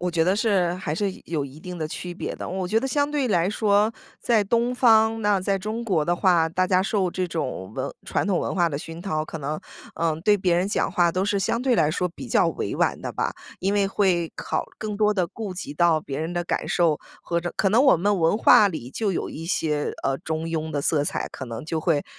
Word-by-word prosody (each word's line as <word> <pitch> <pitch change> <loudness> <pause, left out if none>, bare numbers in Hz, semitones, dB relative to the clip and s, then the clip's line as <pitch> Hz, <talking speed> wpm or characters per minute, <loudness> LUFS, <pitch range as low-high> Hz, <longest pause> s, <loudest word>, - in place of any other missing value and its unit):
我 180 - -1
觉 170 -2 +1
得 185 +4 +2
是 195 -6 +2
还 175 -5 -3
是 200 +3 0
有 155 -4 -2
一 140 +2 -10
定 180 +2 -7
的 155 -2 -2
区 175 +2 -6
别 - - -4
的。 - - -6
我 185 0 -3
觉 220 - +3
得 265 - -2
相 285 +2 0
对 290 -3 0
来 180 -2 +2
说 210 +1 +2 0.3
在 225 -4 +2
东 235 +4 +1
方， 225 -2 +4
那 205 -2 +2
在 195 +1 0
中 215 +4 -4
国 185 -9 +1
的 175 - +1
话， 175 -3 +3
大 185 +3 +1
家 185 0 +3
受 190 -2 0
这 185 0 -2
种 160 - -4
文 - - -3
传 - - -1
统 190 -4 +1
文 - - -2
化 175 -2 +3
的 140 -3 -3
熏 165 +2 -8
陶， 155 -5 -1
可 160 - -7
能， 150 +1 -3 0.4
呃， 165 -1 +1
对 205 +4 +4
别 185 -3 +1
人 180 +3 +1
讲 205 - 0
话 175 -2 +3
都 185 +3 -1
是 205 0 +1
相 230 +4 0
对 255 -2 +2
来 155 -7 +3
说 180 +3 -1
比 170 - -10
较 - - +3
委 - - -3
婉 - - +1
的 - - -4
吧。 - - -2 0.2
因 195 +2 0
为 200 -1 +2
会 180 -5 +1
考 - - -2
更 210 -1 -4
多 210 0 +3
地 185 -4 0
顾 205 +3 -6
及 175 -5 -7
到 170 -1 +3
别 140 -1 -5
人 160 +2 -3
的 175 0 -2
感 - - -2
受， 165 -4 +2 0.2
和 170 -1 -1
这 175 0 -3
可 195 - +2
能 225 +6 +4
我 270 -9 +6
们 200 +4 +1
文 165 +6 +3
化 210 -2 +7
里 155 -9 -6
就 210 +6 -1
有 180 - -2
一 165 - -7
些， 150 -5 -1
呃， 135 - +1
中 160 -2 -3
庸 160 -1 -3
的 145 - -1
色 145 +1 +2
彩， 145 - -2
可 - - -6
能 115 0 -7
就 160 0 -2
会， 155 -3 +1
180 Hz, 270 characters per minute, -24 LUFS, 160-205 Hz, 0.4 s, 化